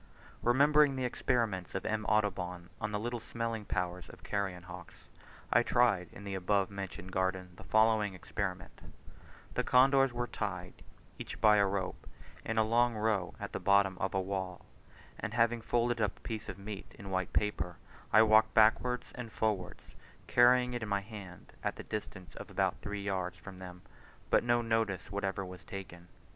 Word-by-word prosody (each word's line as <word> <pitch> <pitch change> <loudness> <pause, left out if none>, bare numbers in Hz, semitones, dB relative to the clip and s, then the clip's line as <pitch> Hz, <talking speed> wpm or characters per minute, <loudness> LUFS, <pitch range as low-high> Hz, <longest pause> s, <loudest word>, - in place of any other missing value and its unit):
Remembering 145 +3 +5
the 130 -1 -1
experiments 110 -7 -1
of 95 - -3
M. 110 0 -1
Audubon, 90 -4 0
on 105 0 -2
the 105 - -1
little 120 +2 -3
smelling 115 -1 -4
powers 90 -2 -3
of - - -14
carrion 95 -3 -2
hawks, 90 -1 -11 0.5
I - - +6
tried 110 -8 +2
in 100 - -11
the 100 -1 -5
above 95 +1 +1
mentioned 95 -1 -6
garden 95 -1 -1
the - - -12
following 110 -2 +3
experiment: 90 -3 -5 0.7
the - - 0
condors 135 +1 +5
were 120 0 -2
tied, 120 - -4 0.5
each - - -7
by 105 -1 +6
a 100 -1 +4
rope, 95 -1 -3 0.4
in 115 - -3
a 110 - +5
long 120 +2 +3
row 105 -4 0
at - - -5
the - - -3
bottom 100 -1 +4
of 95 0 -1
a - - +3
wall; 95 -1 -4 0.5
and 110 - -4
having 115 0 +3
folded 120 0 +1
up 105 -2 0
a - - -21
piece 110 -3 -5
of - - -6
meat 100 0 -8
in 100 -1 -8
white 95 -1 -1
paper, 105 -4 -1 0.4
I 110 +1 +8
walked 110 0 +5
backwards 120 +3 +3
and 120 -3 -7
forwards, 100 -6 -2 0.3
carrying 125 +7 +5
it 120 - -3
in 110 - -4
my 100 0 +1
hand 100 -4 -11
at - - -1
the - - -8
distance 100 -3 -6
of - - -8
about - - 0
three 100 -1 -4
yards 95 -2 -2
from 95 -2 -11
them, 90 -1 -10 0.5
but - - +5
no 120 0 +2
notice 110 -5 -1
whatever 100 -1 -2
was 90 0 -10
taken. 90 -3 -9
100 Hz, 180 wpm, -32 LUFS, 95-115 Hz, 0.7 s, I